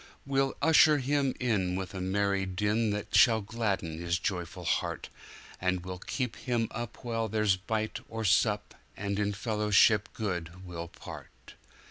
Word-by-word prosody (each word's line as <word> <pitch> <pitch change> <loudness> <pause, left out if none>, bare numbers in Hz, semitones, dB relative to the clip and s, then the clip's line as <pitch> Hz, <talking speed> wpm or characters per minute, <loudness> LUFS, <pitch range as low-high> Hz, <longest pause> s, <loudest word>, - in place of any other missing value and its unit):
We'll 135 0 +1
usher 155 -1 +6
him 140 0 +1
in 95 -8 +1
with 95 -2 -4
a 95 - -4
merry 100 +1 0
dinThat 105 +2 -1
shall 115 -3 +6
gladden 100 -7 -2
his 85 0 0
joyous 90 -2 -3
heart, - - -2 0.5
And 90 -1 -1
we'll 90 -1 -5
keep 125 +4 -3
him 120 -3 -1
up 120 +1 -6
while 115 -2 -1
there's 105 -2 +2
bite 110 +4 -2
or 110 0 -4
sup, 105 +2 +2 0.2
And 100 0 -2
in 105 0 +1
fellowship 105 -1 +3
good, 90 -3 -4
we'll 85 -1 -6
part. - - -12
105 Hz, 145 wpm, -30 LUFS, 95-115 Hz, 0.5 s, usher